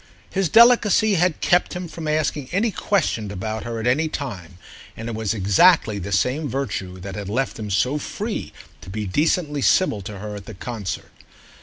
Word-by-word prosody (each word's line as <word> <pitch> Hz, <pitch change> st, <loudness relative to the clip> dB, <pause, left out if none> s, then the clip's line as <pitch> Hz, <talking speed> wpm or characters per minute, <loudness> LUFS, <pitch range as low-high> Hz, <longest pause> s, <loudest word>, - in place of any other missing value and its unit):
His 195 Hz, -3 st, 0 dB
delicacy 225 Hz, -1 st, +6 dB
had 180 Hz, -2 st, +1 dB
kept 175 Hz, 0 st, +2 dB
him 180 Hz, 0 st, -4 dB
from 160 Hz, -1 st, -7 dB
asking 150 Hz, -3 st, -1 dB
any 215 Hz, +5 st, +1 dB
question 170 Hz, -, 0 dB
about 110 Hz, +3 st, -4 dB
her 115 Hz, -1 st, -4 dB
at 110 Hz, -, -4 dB
any 140 Hz, +6 st, +2 dB
time, 95 Hz, -, -6 dB, 0.4 s
and 115 Hz, -, -6 dB
it 115 Hz, -, -4 dB
was 110 Hz, 0 st, -1 dB
exactly 105 Hz, -, +4 dB
the 100 Hz, +2 st, -6 dB
same 130 Hz, -, +1 dB
virtue 100 Hz, -9 st, -4 dB
that 95 Hz, +1 st, -6 dB
had 100 Hz, 0 st, -5 dB
left 130 Hz, +3 st, -2 dB
him 105 Hz, -1 st, -5 dB
so 125 Hz, +9 st, +1 dB
free 205 Hz, -, -4 dB, 0.3 s
to -, -, -11 dB
be 105 Hz, +2 st, -4 dB
decently 150 Hz, -, 0 dB
civil 130 Hz, -, +3 dB
to 100 Hz, +2 st, -7 dB
her 105 Hz, +1 st, -6 dB
at 100 Hz, -1 st, -9 dB
the 110 Hz, -, -8 dB
concert. 100 Hz, -3 st, -5 dB
120 Hz, 185 wpm, -22 LUFS, 100-160 Hz, 0.4 s, delicacy